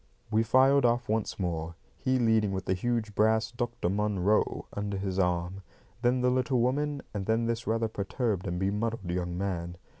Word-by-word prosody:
We 110 Hz, +1 st, +3 dB
filed 130 Hz, +4 st, +4 dB
off 120 Hz, 0 st, +2 dB
once 110 Hz, -1 st, -1 dB
more, 85 Hz, -2 st, -2 dB, 0.2 s
he 130 Hz, 0 st, 0 dB
leading 110 Hz, -4 st, +2 dB
with 95 Hz, -1 st, -3 dB
the 95 Hz, -, +1 dB
huge 110 Hz, +2 st, -1 dB
brass 110 Hz, +2 st, +2 dB
"Dr. 120 Hz, -6 st, -2 dB
Munro" 105 Hz, +1 st, +1 dB
under 100 Hz, -1 st, -3 dB
his 95 Hz, -1 st, -2 dB
arm; 90 Hz, +1 st, 0 dB, 0.4 s
then 125 Hz, +1 st, +2 dB
the 125 Hz, 0 st, +3 dB
little 130 Hz, 0 st, +1 dB
woman, 140 Hz, +4 st, 0 dB
and 100 Hz, -3 st, -4 dB
then 115 Hz, +1 st, +2 dB
this 115 Hz, 0 st, -2 dB
rather 115 Hz, +1 st, +1 dB
perturbed 105 Hz, -1 st, -2 dB
and 85 Hz, -, -2 dB
bemuddled 100 Hz, 0 st, -1 dB
young 90 Hz, -1 st, -2 dB
man. 90 Hz, -3 st, -3 dB
110 Hz, 175 wpm, -29 LUFS, 95-120 Hz, 0.4 s, filed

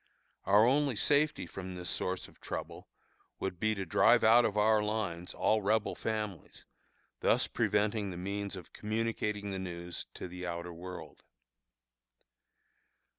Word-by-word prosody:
Our 105 Hz, +3 st, +6 dB
only 140 Hz, 0 st, +3 dB
safety 150 Hz, +7 st, +2 dB
from 95 Hz, -1 st, -7 dB
this 90 Hz, -1 st, -6 dB
source 95 Hz, 0 st, -1 dB
of -, -, -21 dB
trouble -, -, -6 dB, 0.5 s
would 90 Hz, -2 st, -3 dB
be 110 Hz, +1 st, +1 dB
to 95 Hz, -1 st, -3 dB
drive 80 Hz, -, +5 dB
out 115 Hz, +2 st, +7 dB
of 105 Hz, -, -1 dB
our 105 Hz, 0 st, +4 dB
lines 95 Hz, -5 st, -3 dB
all 110 Hz, 0 st, +2 dB
Rebel 110 Hz, +2 st, +1 dB
families, 105 Hz, -5 st, -4 dB, 0.5 s
thus -, -, +3 dB
preventing 105 Hz, -1 st, 0 dB
the 90 Hz, -, -6 dB
means 100 Hz, +2 st, -3 dB
of 90 Hz, -, -11 dB
communicating 105 Hz, -2 st, -2 dB
the 95 Hz, -, -3 dB
news 85 Hz, -2 st, -6 dB
to -, -, -6 dB
the 90 Hz, +1 st, -8 dB
outer 85 Hz, 0 st, -4 dB
world. 90 Hz, +2 st, -9 dB
100 Hz, 140 wpm, -32 LUFS, 90-110 Hz, 0.5 s, out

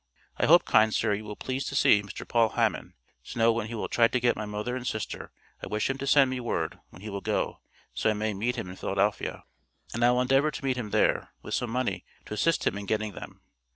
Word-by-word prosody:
I -, -, +2 dB
hope -, -, +7 dB
kind 110 Hz, 0 st, +4 dB
sir 105 Hz, 0 st, +1 dB
you 105 Hz, +1 st, -3 dB
will 105 Hz, 0 st, -6 dB
please 130 Hz, +4 st, -3 dB
to 140 Hz, -, -4 dB
see 105 Hz, -6 st, +5 dB
Mr. 105 Hz, -, -9 dB
Paul 115 Hz, -2 st, +3 dB
Hammon, -, -, -1 dB, 0.3 s
to -, -, -8 dB
know 115 Hz, 0 st, +5 dB
when 115 Hz, -1 st, -2 dB
he 115 Hz, -, -6 dB
will 110 Hz, -, -3 dB
try 115 Hz, -1 st, +4 dB
to 125 Hz, -, 0 dB
get 120 Hz, 0 st, +2 dB
my 105 Hz, -, -5 dB
Mother 105 Hz, +4 st, -3 dB
and 125 Hz, -1 st, -4 dB
Sister 110 Hz, -2 st, -4 dB, 0.3 s
I -, -, -4 dB
wish 105 Hz, +5 st, 0 dB
him 135 Hz, -, -6 dB
to 140 Hz, -, -4 dB
send 135 Hz, -2 st, +5 dB
me 130 Hz, -, -2 dB
word 120 Hz, -, -2 dB
when 90 Hz, -, -14 dB
he 110 Hz, -, -5 dB
will 100 Hz, 0 st, -4 dB
go -, -, -1 dB, 0.3 s
so -, -, +1 dB
I -, -, +3 dB
may 110 Hz, 0 st, -1 dB
meet 115 Hz, +5 st, -1 dB
him -, -, -4 dB
in 90 Hz, +1 st, -9 dB
Philadelphia. 100 Hz, +2 st, -1 dB, 0.5 s
And 120 Hz, -, -1 dB
I 120 Hz, -, +6 dB
will 125 Hz, 0 st, +3 dB
Endevor 135 Hz, +3 st, +3 dB
to -, -, -6 dB
meet 130 Hz, -1 st, +1 dB
him 120 Hz, -4 st, -4 dB
there -, -, +2 dB
With -, -, -6 dB
some 125 Hz, -, -1 dB
money 115 Hz, -7 st, -1 dB, 0.2 s
to -, -, -7 dB
assist 165 Hz, +10 st, +1 dB
him 100 Hz, -, 0 dB
in 100 Hz, -, -8 dB
getting 110 Hz, -1 st, -1 dB
them. -, -, -10 dB
115 Hz, 255 wpm, -28 LUFS, 105-125 Hz, 0.5 s, hope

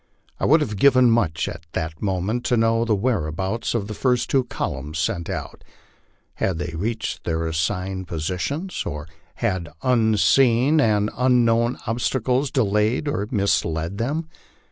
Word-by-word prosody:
I -, -, 0 dB
would 155 Hz, +2 st, +5 dB
have 105 Hz, -8 st, -2 dB
given 130 Hz, 0 st, +5 dB
much 85 Hz, -9 st, +1 dB
at 80 Hz, -, -8 dB
that 80 Hz, -1 st, -4 dB
moment 100 Hz, +4 st, -1 dB
to 125 Hz, -, +2 dB
know 115 Hz, +1 st, +2 dB
the 110 Hz, -2 st, +2 dB
whereabouts 95 Hz, 0 st, -1 dB
of 110 Hz, -4 st, -1 dB
the 105 Hz, -, -5 dB
first 125 Hz, +2 st, 0 dB
two 135 Hz, -2 st, +3 dB
columns 75 Hz, -, -4 dB
sent 85 Hz, +1 st, -1 dB
out. -, -, -6 dB, 0.7 s
Had 95 Hz, -4 st, -1 dB
they 85 Hz, -1 st, -4 dB
reached 110 Hz, +6 st, -3 dB
their 80 Hz, 0 st, -1 dB
assigned 90 Hz, +3 st, -2 dB
positions, 95 Hz, -, -3 dB
or 75 Hz, +2 st, -5 dB, 0.3 s
had 90 Hz, -3 st, -2 dB
unseen 120 Hz, -, +4 dB
and 105 Hz, -3 st, +2 dB
un 125 Hz, -1 st, +3 dB
known 115 Hz, +2 st, +2 dB
obstacles 125 Hz, +3 st, 0 dB
delayed 110 Hz, +1 st, +1 dB
or 105 Hz, -8 st, -1 dB
misled 85 Hz, -, 0 dB
them? 150 Hz, +8 st, -2 dB
110 Hz, 145 wpm, -23 LUFS, 90-125 Hz, 0.7 s, would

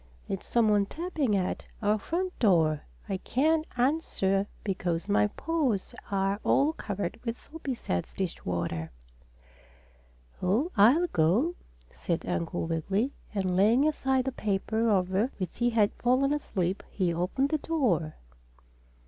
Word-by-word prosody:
"It's 195 Hz, -, -4 dB
some 235 Hz, -2 st, +3 dB
one 205 Hz, -1 st, +3 dB
tapping 310 Hz, -, -1 dB
at 185 Hz, -2 st, -2 dB
our 210 Hz, 0 st, +2 dB
front 360 Hz, -, -3 dB
door. 160 Hz, -8 st, +3 dB, 0.3 s
I 190 Hz, -, -1 dB
can't 310 Hz, +10 st, +1 dB
answer 225 Hz, -8 st, +1 dB, 0.2 s
because 180 Hz, -3 st, -2 dB
my 205 Hz, 0 st, +3 dB
paws 265 Hz, -, -1 dB, 0.2 s
are 195 Hz, +1 st, 0 dB
all 295 Hz, +3 st, +3 dB
covered 205 Hz, -, -4 dB
with 230 Hz, -1 st, -3 dB
soapy 290 Hz, -4 st, -6 dB
suds 90 Hz, -, -3 dB
dishwater." 85 Hz, -, -3 dB, 1.5 s
"Oh, 225 Hz, -, +1 dB
I'll 245 Hz, -, +6 dB
go," 215 Hz, -, +2 dB, 0.4 s
said -, -, -3 dB
Uncle 85 Hz, -, -2 dB
Wiggily, 190 Hz, -, 0 dB, 0.2 s
and 185 Hz, -2 st, 0 dB
laying 225 Hz, +10 st, +4 dB
aside 265 Hz, -4 st, +1 dB
the 265 Hz, -, -1 dB
paper 220 Hz, +1 st, 0 dB
over 190 Hz, +3 st, +2 dB
which 185 Hz, +2 st, -5 dB
he 240 Hz, 0 st, +3 dB
had 220 Hz, -3 st, +2 dB
fallen 260 Hz, +3 st, +2 dB
asleep, 195 Hz, -10 st, -1 dB
he 180 Hz, -4 st, 0 dB
opened 185 Hz, +11 st, 0 dB
the 310 Hz, -, 0 dB
door. 215 Hz, -, 0 dB
210 Hz, 130 wpm, -29 LUFS, 185-265 Hz, 1.5 s, I'll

